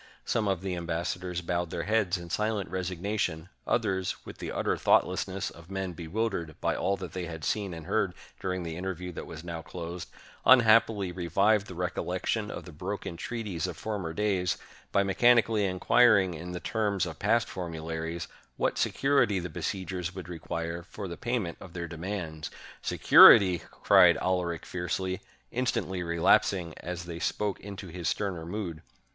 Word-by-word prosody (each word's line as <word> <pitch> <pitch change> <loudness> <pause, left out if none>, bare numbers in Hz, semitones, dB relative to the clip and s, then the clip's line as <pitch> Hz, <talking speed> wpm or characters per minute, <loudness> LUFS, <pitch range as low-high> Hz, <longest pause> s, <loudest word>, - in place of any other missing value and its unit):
Some 110 -2 0
of 95 -3 0
the 95 -2 -2
ambassadors 85 +1 -3
bowed 85 0 -1
their 85 0 -3
heads 100 -2 +1
in 85 -1 -9
silent 105 -1 -1
resignation; 95 -2 -2 0.2
others, 95 -1 0
with - - -10
the - - -4
utter - - 0
thoughtlessness 95 +1 +1
of 85 +1 -15
men 95 -2 -3
bewildered 85 -1 -3
by - - 0
all 100 0 0
that 95 - -7
they 90 -1 -3
had 80 -2 -6
seen 100 -3 -1
and 80 -2 -7
heard 95 -1 0 0.2
during 90 -1 -2
the 80 -1 -5
interview 90 0 -4
that 85 - -7
was 80 0 -8
now 85 -1 -5
closed, 85 +1 -7 0.3
unhappily 115 -5 +5
revived 100 +4 +2
the 90 - -8
recollection 90 +4 -2
of - - -6
the 90 - -9
broken 90 +3 -5
treaties 100 -5 -3
of 90 - -6
former 100 -7 -3
days, 95 -2 0 0.3
by 100 - +3
mechanically 110 +1 +4
inquiring, 95 0 +4
in 85 +3 -7
the 90 - -4
terms 105 -3 0
of 80 -2 -7
past 115 +3 +2
formularies, 80 -1 -4 0.3
what - - 0
security 135 -7 +2
the 90 -1 -3
besieg 95 +3 -3
ers 90 0 -3
would 90 -3 -7
require 85 0 -4
for 100 +3 -7
the 85 - -5
pajrment 115 -8 -2
of 90 - -11
their 85 -1 -4
demands. 85 -3 -5 0.3
"Security!" 90 -3 +8 0.2
cried - - +7
Alaric 90 -3 -1
fiercely, 90 +1 -2 0.3
instantly 115 -7 -1
relapsing 85 +1 +2
as 90 0 -5
they 85 -1 -6
spoke 100 +2 -1
into 100 -2 -8
his 85 -1 -2
sterner 90 -5 -2
mood. 90 -4 -4
90 Hz, 165 wpm, -29 LUFS, 85-100 Hz, 0.3 s, Security